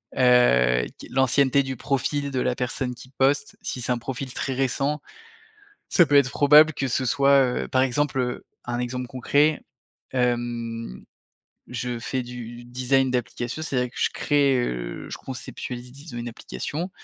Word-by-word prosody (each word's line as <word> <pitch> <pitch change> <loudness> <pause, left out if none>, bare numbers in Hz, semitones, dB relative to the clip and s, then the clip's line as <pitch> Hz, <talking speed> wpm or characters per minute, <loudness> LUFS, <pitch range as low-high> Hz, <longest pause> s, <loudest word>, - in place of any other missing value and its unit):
Heu, 60 - +4
q - - -10
l'ancienneté 135 +1 +3
du 135 0 -4
profil 140 +2 -1
de 130 -2 -2
la 125 - +1
personne 125 0 -2
qui 130 - -13
poste, 135 +2 +1
si 125 - -4
c'est 120 - -2
un 125 - +2
profil 130 +2 -5
très 135 - -3
récent, 135 +3 0 0.9
ça 175 - +5
peut 145 -2 +3
être 140 -2 +5
probable 150 +2 +6
que 135 - -1
ce 130 +1 0
soit, 140 +2 +5 0.2
heu, - - -9
par 130 - +2
exemple, 135 +1 0
heu, 125 -1 -3 0.2
un 120 0 -2
exemple 125 +1 -3
concret, 145 +5 +2 0.5
hem, 120 - -2 0.7
je 125 0 -3
fais 130 +2 -2
du 120 -1 -8
design 130 +2 +1
d'application. 125 +3 -3
C'est-à-dire 125 -5 -1
que - - -11
je - - +2
crée, 145 -2 +2
heu, - - -3
je - - -6
conceptualise 125 -1 -7
disons 140 -2 -9
une 120 - -4
application. 155 +8 -5
130 Hz, 160 wpm, -24 LUFS, 120-140 Hz, 0.9 s, probable